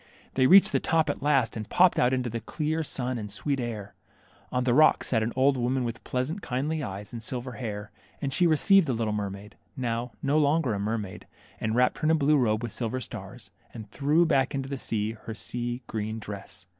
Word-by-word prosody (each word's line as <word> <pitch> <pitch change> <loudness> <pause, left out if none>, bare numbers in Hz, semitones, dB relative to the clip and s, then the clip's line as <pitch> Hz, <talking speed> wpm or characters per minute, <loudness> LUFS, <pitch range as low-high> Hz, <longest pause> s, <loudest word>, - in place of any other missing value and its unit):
They 130 -1 +4
reached 195 +5 +7
the - - +2
top 160 -3 +2
at - - -8
last, 135 -5 +2
and 110 -2 -6
popped 180 0 +4
out 125 - +4
into 130 -1 0
the 115 0 -3
clear 155 +7 -2
sun 125 -4 -2
and 105 -1 -6
sweet 135 +7 -1
air. 110 -5 -5 0.6
On 125 0 0
the 125 -1 +2
rocks 155 +4 +4
sat 115 -3 +2
an 110 +2 -1
old 135 +1 +3
woman 125 +1 0
with 115 -1 -5
pleasant, 135 +10 -2
kindly 145 +5 -2
eyes 100 -3 -6
and 115 - -5
silver 125 +1 -4
hair; 105 -4 -6 0.3
and 135 -2 -2
she 175 +2 +4
received 170 +3 +5
the 130 - +1
little 110 -2 -1
mermaid, 100 0 -5 0.2
now 120 -1 -2
no 145 +2 +3
longer 145 -4 +2
a 100 - -2
mermaid, 105 -2 -4 0.3
and 110 0 -1
wrapped 125 +1 +2
her - - -2
in - - +4
a 160 - +5
blue 150 0 +3
robe 110 -3 +1
with 120 - -4
silver 120 +1 -3
stars, 125 - -9 0.2
and 110 -2 -9
threw 150 +5 +3
back 135 -4 +2
into 135 -1 -3
the 140 - -2
sea 110 -2 -1
her 110 0 -8
sea 120 +2 -3
green 110 0 -4
dress. 100 -3 -7
125 Hz, 220 wpm, -27 LUFS, 110-140 Hz, 0.6 s, reached